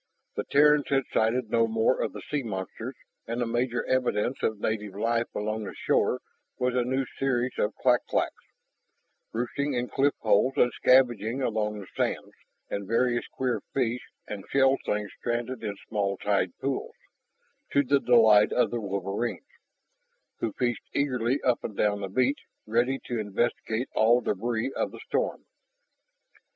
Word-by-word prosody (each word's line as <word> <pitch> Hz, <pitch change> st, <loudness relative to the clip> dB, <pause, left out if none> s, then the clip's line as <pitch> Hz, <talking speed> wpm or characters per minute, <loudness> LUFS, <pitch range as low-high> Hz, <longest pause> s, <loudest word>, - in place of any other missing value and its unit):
The -, -, -3 dB
Terrans 150 Hz, 0 st, +4 dB
had 135 Hz, -1 st, +2 dB
sighted 115 Hz, +1 st, +1 dB
no 115 Hz, -1 st, +3 dB
more 110 Hz, +3 st, +2 dB
of -, -, -2 dB
the -, -, -8 dB
sea 150 Hz, -1 st, +1 dB
monsters, 110 Hz, +3 st, -5 dB, 0.3 s
and 115 Hz, +1 st, -3 dB
the 120 Hz, -, +1 dB
major 120 Hz, +1 st, -1 dB
evidence 125 Hz, -1 st, 0 dB
of 110 Hz, -2 st, 0 dB
native 105 Hz, -2 st, -2 dB
life 115 Hz, +3 st, 0 dB
along 110 Hz, +1 st, -2 dB
the -, -, -7 dB
shore -, -, +1 dB, 0.4 s
was 125 Hz, 0 st, 0 dB
a 125 Hz, -, +2 dB
new 130 Hz, +2 st, 0 dB
species 130 Hz, -1 st, -1 dB
of 105 Hz, -, 0 dB
clak 125 Hz, -1 st, +2 dB
claks, -, -, -1 dB, 0.9 s
roosting 130 Hz, +4 st, -2 dB
in 125 Hz, 0 st, -1 dB
cliff 140 Hz, +1 st, +2 dB
holes 110 Hz, +4 st, +3 dB
and 125 Hz, -, +4 dB
scavenging 125 Hz, -1 st, +3 dB
along 105 Hz, -2 st, -1 dB
the 100 Hz, -, -8 dB
sands, -, -, -1 dB, 0.4 s
and 100 Hz, -1 st, -4 dB
various 120 Hz, +2 st, +1 dB
queer 130 Hz, -2 st, -2 dB
fish 125 Hz, -2 st, 0 dB, 0.3 s
and 100 Hz, -2 st, -6 dB
shelled 135 Hz, 0 st, +3 dB
things 105 Hz, -1 st, -1 dB
stranded 120 Hz, +1 st, -3 dB
in 105 Hz, -2 st, -3 dB
small 100 Hz, -2 st, -1 dB
tide 100 Hz, -3 st, 0 dB
pools 135 Hz, -1 st, -3 dB, 0.8 s
to 140 Hz, -, +4 dB
the 140 Hz, +1 st, +3 dB
delight 110 Hz, -5 st, +6 dB
of 125 Hz, -, +2 dB
the 120 Hz, -1 st, -2 dB
wolverines, 100 Hz, -, -3 dB, 0.9 s
who -, -, -1 dB
fished 120 Hz, -2 st, -1 dB
eagerly 130 Hz, -2 st, +1 dB
up 125 Hz, -2 st, +2 dB
and 105 Hz, -, -6 dB
down 105 Hz, -1 st, +1 dB
the 100 Hz, -, -3 dB
beach, 130 Hz, +7 st, +1 dB, 0.3 s
ready 120 Hz, +4 st, +1 dB
to 120 Hz, -2 st, -2 dB
investigate 110 Hz, +3 st, -1 dB
all 115 Hz, +3 st, +5 dB
debris 115 Hz, +3 st, -1 dB
of -, -, 0 dB
the -, -, -10 dB
storm. -, -, -1 dB
120 Hz, 160 wpm, -27 LUFS, 105-130 Hz, 0.9 s, delight